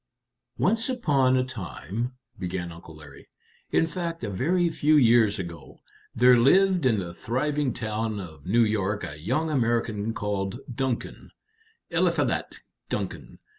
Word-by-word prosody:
"Once 225 +5 +1
upon 140 - +2
a 130 - +2
time," 115 - -5 0.3
began 90 -2 -4
Uncle 85 -1 -12
Larry 75 -3 -14 0.4
"in - - +3
fact, 165 -1 -4
a 105 - -2
very 170 - +1
few 155 -1 +3
years 115 -6 +5
ago 85 -3 -8 0.4
there 125 +1 +6
lived 180 +6 +4
in 115 -4 +3
the 90 -3 -4
thriving 140 - -1
town 110 -2 -3
of 80 -6 -10
New 115 +5 +4
York 105 -2 0
a 75 +1 -6
young 155 - 0
American 115 -5 0
called 100 +1 -2
Duncan 130 -1 -3 0.6
Eliphalet - - 0 0.3
Duncan. - - -4
115 Hz, 130 wpm, -26 LUFS, 95-140 Hz, 0.6 s, there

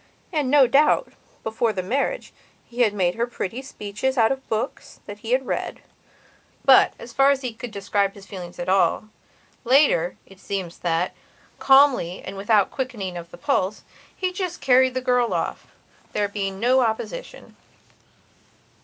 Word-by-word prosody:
And, 295 -5 0
no 285 -1 +6
doubt, 285 +4 +3 0.3
before 220 +1 0
the 185 - -3
marriage, 280 - -2 0.3
he 240 -2 +2
made 185 -4 0
her 235 +4 -1
pretty 240 0 -5
speeches 265 +1 -4
out 225 0 +4
of 270 0 -5
books 220 0 -4
that 205 0 -9
he 225 - -8
had 260 +1 +2
read. - - -4 0.8
But, - - +6
as 235 - -11
far 275 +2 +4
as 280 -1 +2
he 250 -3 -4
could 240 +2 -7
describe 200 -1 -1
his 200 -1 -13
feelings 180 -4 -9
at 175 - -5
all, 195 +3 +2 0.5
later, 250 - +3
it 195 -1 -18
seems 190 -4 -5
that, 170 +1 -1 0.5
calmly 270 -10 +4
and - - -7
without 200 0 +2
any - - -24
quickening 225 -9 -4
of 170 -1 -8
the 175 - -12
pulse, 190 +3 -1 0.3
he 370 -1 -2
just 365 -2 -4
carried 260 0 +4
the 255 - -1
girl 245 -5 +1
off, 165 - -3 0.5
there 205 - +1
being 195 -1 -4
no 250 +4 +3
opposition. - - -3
225 Hz, 160 wpm, -23 LUFS, 195-265 Hz, 0.8 s, no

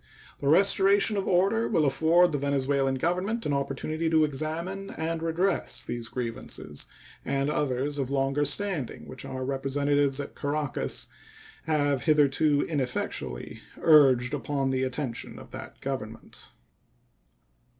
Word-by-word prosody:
The 140 - -3
restoration 195 +5 +5
of 195 -1 -2
order 195 +6 +2
will 165 -7 +2
afford 165 +5 +4
the 145 - -1
Venezuelan 135 -1 +1
Government 180 - -1
an 145 - 0
opportunity 140 +4 -2
to 160 -1 +4
examine 165 +7 -3
and 160 0 -3
redress 165 +4 0
these 120 -1 -4
grievances 115 - -5 0.4
and 140 +2 0
others 145 0 -1
of 130 -2 -1
longer 135 +1 +1
standing 155 - -2
which - - -9
our 130 0 -4
representatives 140 +1 0
at 140 - -5
Caracas 145 -1 -2 0.6
have 145 -4 +1
hitherto 150 -1 +3
ineffectually 125 - -3 0.2
urged 135 -5 +5
upon 140 -1 -1
the 130 0 0
attention 130 -1 -3
of - - -12
that - - -9
Government. 115 -5 -6
145 Hz, 125 wpm, -27 LUFS, 135-165 Hz, 0.6 s, restoration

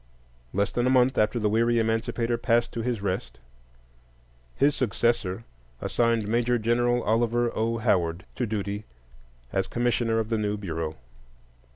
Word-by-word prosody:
Less 100 +1 0
than 120 +1 0
a - - +3
month 130 0 +4
after 110 +2 +2
the 105 -2 +1
weary 115 +3 +2
Emancipator 115 +1 0
passed 120 0 +1
to 115 - -4
his 115 -3 -2
rest, 90 -12 -3 1.2
his 145 +1 +3
successor 115 -4 0 0.4
assigned 115 - +1
Major 120 +2 +2
Gen. 115 +2 +1
Oliver 120 0 +1
O. 115 +1 0
Howard 85 -5 0
to 125 - -2
duty 105 0 -3 0.7
as 95 0 0
Commissioner 120 -1 0
of 110 -1 -1
the 115 -2 0
new 105 0 -1
Bureau. 80 -5 -4
115 Hz, 145 wpm, -26 LUFS, 105-120 Hz, 1.2 s, month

